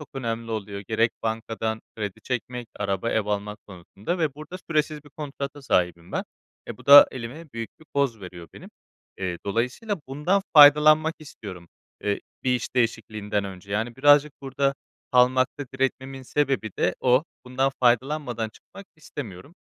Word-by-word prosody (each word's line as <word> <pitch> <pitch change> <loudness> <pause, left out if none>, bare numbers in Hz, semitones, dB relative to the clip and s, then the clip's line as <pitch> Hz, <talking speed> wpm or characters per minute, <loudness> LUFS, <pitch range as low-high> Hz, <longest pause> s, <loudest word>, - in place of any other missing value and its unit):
çok 150 - -10
önemli 115 -3 -3
oluyor. 100 -2 -4
Gerek 110 +3 +1
bankadan 110 0 -2 0.2
kredi 105 -4 -5
çekmek, 125 -1 -4
araba, 100 +2 -1
ev 110 -2 0
almak 105 0 -3
konusunda 100 - -5
ve 155 -5 0
burada 155 +5 -9
süresiz 150 -1 0
bir 145 - -16
kontrata 140 -1 -6
sahibim 90 -7 0
ben. - - -1 0.4
E, - - -6
bu - - -17
da 145 +1 +11
elime 130 +6 -8
büyük 115 -1 -5
bir - - -16
koz 135 -6 +1
veriyor 90 -3 -10
benim. - - -12 0.5
Eee, 90 -2 -3
dolayısıyla 125 - -1
bundan 160 +9 +1
faydalanmak 155 +2 +8
istiyorum, 95 - -10 0.4
eee, 100 -1 0 0.2
bir 125 -1 +3
iş 125 +1 -4
değişikliğinden 110 -3 -1
önce. 95 +1 -8
Yani 115 +3 -2
birazcık 145 +2 +5
burada 135 +1 0 0.4
kalmakta 130 +2 +3
diretmemin 135 0 -2
sebebi 135 -4 0
de 90 - +2
o. 130 +4 +4 0.2
Bundan 130 +2 0
faydalanmadan 125 -2 +1
çıkmak 195 - -15
istemiyorum, 140 - -9
125 Hz, 150 wpm, -25 LUFS, 105-145 Hz, 0.5 s, da